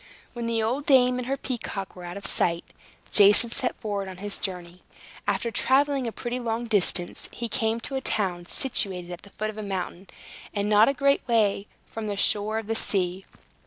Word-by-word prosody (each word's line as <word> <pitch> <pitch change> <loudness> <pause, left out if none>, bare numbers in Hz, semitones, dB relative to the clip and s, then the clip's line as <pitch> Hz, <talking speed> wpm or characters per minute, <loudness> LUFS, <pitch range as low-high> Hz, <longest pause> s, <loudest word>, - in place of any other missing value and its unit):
When 235 -2 -4
the 225 -1 0
old 255 +6 -1
dame 250 -2 +5
and 250 - -5
her 275 +1 -1
peacock 220 -7 -5
were 180 -1 -9
out 175 +2 -6
of 200 - -8
sight, 170 -1 0 0.5
Jason 210 +3 +6
set 255 -1 -1
forward 200 -2 -3
on 185 -1 -8
his 205 +2 -1
journey. 180 -2 -5 0.5
After 205 +3 0
traveling 270 +2 +2
a - - -2
pretty 240 +2 -4
long 235 0 -2
distance, 195 -5 +1
he 235 - -4
came 225 0 0
to 270 - -5
a 265 - -1
town 180 -7 -1
situated 185 -9 -1
at 175 - -9
the 200 - -15
foot 215 +2 -4
of 215 - -10
a - - -3
mountain, 190 -2 -4 0.5
and 205 0 0
not 210 +2 +6
a 275 - 0
great 280 +1 +3
way 210 -4 +2 0.2
from 225 -1 -6
the 205 -1 -3
shore 210 +2 +2
of 225 - -3
the 225 - -1
sea. 190 -3 0
215 Hz, 200 wpm, -26 LUFS, 195-240 Hz, 0.5 s, Jason